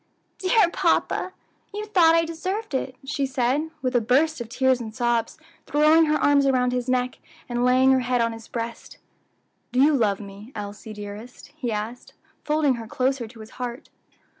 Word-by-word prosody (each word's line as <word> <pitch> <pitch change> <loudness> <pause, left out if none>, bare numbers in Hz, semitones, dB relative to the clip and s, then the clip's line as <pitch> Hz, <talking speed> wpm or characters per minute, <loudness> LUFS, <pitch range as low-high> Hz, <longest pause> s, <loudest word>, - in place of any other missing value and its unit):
"Dear 380 +1 +4
papa, 370 - +1 0.4
you 420 +1 -5
thought 345 -6 +5
I 330 0 +3
deserved 370 +5 -4
it," 260 -1 -2
she 280 -1 -1
said, 260 +4 0
with 255 0 -1
a 240 - +4
burst 275 +6 +2
of 230 - -6
tears 260 +1 +2
and 220 -1 -7
sobs, 240 -1 0 0.3
throwing 305 +2 +5
her 305 0 +2
arms 285 -1 +3
around 250 -2 +2
his 250 0 -2
neck, 250 0 0 0.3
and 240 -1 -1
laying 255 +1 +5
her 260 - +4
head 250 0 0
on 230 -1 +1
his 225 0 -11
breast. 230 0 -6 0.7
"Do 250 - 0
you 290 +2 +5
love 210 -6 +1
me, 205 +3 -11
Elsie, 210 +1 -7
dearest?" 210 +6 -9
he 255 -7 -3
asked, 220 +4 -5 0.3
folding 300 -4 +1
her 225 - -9
closer 255 0 -1
to 225 0 -13
his 215 - -12
heart. 245 0 -5
255 Hz, 180 wpm, -24 LUFS, 230-295 Hz, 0.7 s, thought